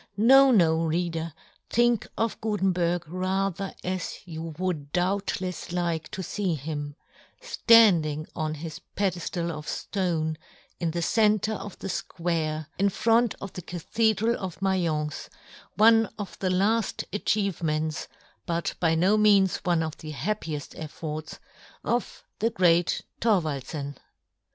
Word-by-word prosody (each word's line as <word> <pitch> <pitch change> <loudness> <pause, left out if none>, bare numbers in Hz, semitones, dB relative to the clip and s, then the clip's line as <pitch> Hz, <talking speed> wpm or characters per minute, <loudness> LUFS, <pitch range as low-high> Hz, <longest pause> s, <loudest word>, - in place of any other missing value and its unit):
No, 270 +5 +7
no, 165 -8 +4
reader, 165 0 -1 0.4
think 240 -2 +2
of 225 0 -1
Gutenberg 180 -5 0
rather 190 +2 -2
as 185 -1 -3
you 165 -2 -6
would 165 -6 -3
doubtlefs 185 -1 -1
like 170 -3 -1
to 190 - -5
fee 185 -1 -1
him, 145 0 -5 0.7
{land 210 -9 +8
ing 150 +1 -4
on 155 -1 -2
his 155 0 -7
pedeflal 175 -3 -1
of 150 -1 -7
flone, 165 -5 -1 0.4
in 170 - 0
the 170 +1 -2
centre 215 +1 +2
of 205 -2 -7
the - - -6
fquare, 165 -4 -2
in 200 +1 +4
front 225 +3 +2
of 195 - -7
the 180 - -6
Cathedral 220 +7 0
of 185 -3 -5
Maience, 170 -6 -1 0.5
one 225 0 +6
of 205 -3 -6
the 190 - 0
lafl 205 +4 +1
achievements, 165 -7 -1 0.4
but 170 0 -1
by 165 -2 +3
no 185 +6 +3
means 200 -3 +4
one 175 -3 +1
of 160 -1 -5
the 155 -1 -7
happiefl 160 -4 -3
efforts, 155 0 -6 0.5
of 240 0 -2 0.2
the 225 - +2
great 175 -4 +2 0.2
Thorwaldfen. 150 - -1
180 Hz, 130 wpm, -27 LUFS, 160-200 Hz, 0.7 s, land